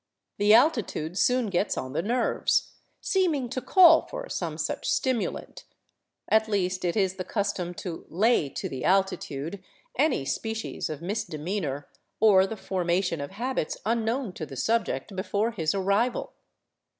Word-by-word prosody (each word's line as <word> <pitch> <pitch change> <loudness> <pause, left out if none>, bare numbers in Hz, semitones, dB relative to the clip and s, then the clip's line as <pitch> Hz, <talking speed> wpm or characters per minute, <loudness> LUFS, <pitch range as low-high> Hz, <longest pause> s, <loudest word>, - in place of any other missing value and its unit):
The 205 +1 +6
altitude 230 - +2
soon 245 +2 +2
gets 190 +3 0
on 130 0 -4
the 150 - 0
nerves, 235 +6 +1 0.3
seem 370 -5 +2
ing 255 -4 -3
to 255 +1 -3
call 330 +5 +6
for - - -6
some - - -3
such - - -2
stimulant; 255 -4 -1 0.6
at 220 0 +3
least, 185 -3 -1
it 175 +3 0
is 190 -2 +1
the 185 - -3
custom 195 -4 -2
to 170 -1 -7
" - - -28
lay 195 - +2
to - - -4
the 130 -2 -6
altitude 185 -2 0 0.2
" - - -38
any 255 - 0
species 220 +9 -3
of 155 +1 -6
misdemeanor, 170 -6 -3 0.3
or 195 -3 +6
the 220 - -6
formation 175 -3 -1
of 140 - -5
habits 235 -3 -3
unknown 230 0 0
to 160 - -5
the 135 - -9
subject 205 - -1
before 205 +4 -1
his 160 -6 -1
arrival. 200 +5 0
200 Hz, 155 wpm, -27 LUFS, 175-230 Hz, 0.6 s, The